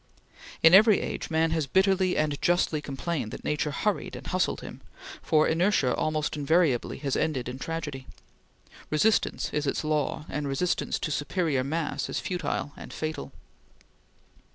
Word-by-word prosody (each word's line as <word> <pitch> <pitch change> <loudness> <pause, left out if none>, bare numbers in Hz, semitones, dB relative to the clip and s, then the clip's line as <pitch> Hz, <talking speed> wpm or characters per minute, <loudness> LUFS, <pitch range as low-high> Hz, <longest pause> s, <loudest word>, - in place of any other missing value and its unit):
In 165 +1 +8
every 210 +1 +7
age - - -4
man 160 0 +2
has 160 -3 0
bitterly 190 +2 +2
and 150 -2 0
justly 175 -3 +2
complained 140 -2 -3
that - - -8
Nature 150 0 -1
hurried 200 +8 -2
and - - -9
hustled 185 0 0
him, - - -9 0.4
for 155 0 +3
inertia 165 -6 +2
almost 155 -1 -1
invariably 150 -3 +1
has 140 -3 -2
ended 135 -6 -1
in 125 +1 -6
tragedy. 150 -4 -5 0.8
Resistance 205 +8 +1
is 150 -1 -1
its 140 - -1
law, 155 0 -1
and 145 -1 -3
resistance 140 +6 0
to 160 - -3
superior 145 -2 0
mass 155 +3 -2
is - - -2
futile 180 -5 -3
and - - -10
fatal. 155 0 -4
155 Hz, 150 wpm, -27 LUFS, 145-175 Hz, 0.8 s, In